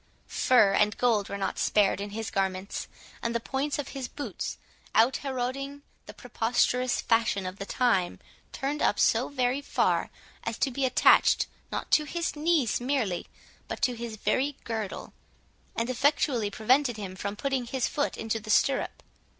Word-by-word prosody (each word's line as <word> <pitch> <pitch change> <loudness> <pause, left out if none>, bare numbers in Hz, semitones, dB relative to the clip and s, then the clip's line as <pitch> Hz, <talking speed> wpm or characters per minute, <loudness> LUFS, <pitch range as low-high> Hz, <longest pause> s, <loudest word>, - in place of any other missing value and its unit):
Fur 215 -6 +4
and 210 +1 +2
gold 225 -5 +2
were 200 - -3
not 195 - -2
spared 200 -2 +2
in 205 - -4
his 220 +1 -5
garments; 190 0 -2 0.3
and 235 0 -2
the - - +2
points 270 +5 -2
of 290 -2 -4
his 270 -3 -5
boots, 285 +4 -5 0.4
out 235 +4 +5
heroding 275 +1 -4 0.2
the - - -9
preposterous 250 +2 +1
fashion 225 -4 +1
of 185 +1 -5
the 200 - -5
time, 210 -8 +1 0.3
turned 285 +2 -3
up - - +2
so - - +3
very 260 0 0
far, - - +1 0.3
as 230 0 -3
to 270 - +1
be 270 +2 0
attached, 255 0 +5 0.3
not - - -4
to 305 - +5
his 335 +2 -2
knees 300 -7 +1
merely, 245 -9 -1 0.4
but - - -5
to 250 - +3
his 235 -1 -6
very 270 +6 0
girdle, 220 -4 -5 0.6
and 230 - -1
effectually 255 -3 +1
prevented 240 +4 +2
him 195 -3 -6
from 200 +2 -4
putting 265 +1 -2
his 260 0 0
foot 290 - -1
into 225 0 -2
the 215 0 -11
stirrup. 270 +5 +1
240 Hz, 165 wpm, -28 LUFS, 210-270 Hz, 0.6 s, out